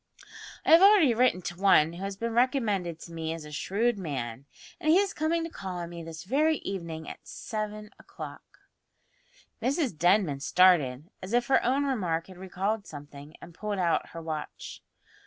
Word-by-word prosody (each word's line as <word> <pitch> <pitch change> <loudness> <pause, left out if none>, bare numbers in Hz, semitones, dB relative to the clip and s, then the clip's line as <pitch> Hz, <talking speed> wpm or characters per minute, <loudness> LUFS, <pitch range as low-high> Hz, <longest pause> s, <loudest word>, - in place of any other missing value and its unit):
"I - - +3
have 330 +2 +9
already 390 - +7
written 230 -6 +2
to 175 +2 -6
one 165 -5 +5
who 175 +3 -7
has 195 0 -4
been 230 +2 -3
recommended 220 - +1
to 170 - -10
me 160 -1 -3
as 165 -2 -8
a 150 - -10
shrewd 210 +8 0
man, 135 -6 -5 0.3
and 310 -3 -1
he 325 - +7
is 395 0 +1
coming 325 +2 0
to 330 - -4
call 185 - -6
on 170 -1 -5
me 170 -1 -7
this 165 0 -8
very 300 +10 +2
evening 170 -5 -5
at - - -10
seven 215 -2 -5
o'clock." - - -11 1.0
Mrs 270 - 0
Denman 175 -3 +2
started, 155 -3 +3
as 185 +4 -6
if 240 0 +3
her 270 - +4
own 270 +4 +1
remark 180 -11 -1
had 185 -2 -13
recalled 195 +3 -2
something, 145 0 -11
and 170 - -11
pulled 210 +3 -4
out 175 -3 +1
her 165 - -8
watch. 155 -2 -6
190 Hz, 180 wpm, -28 LUFS, 165-240 Hz, 1.0 s, have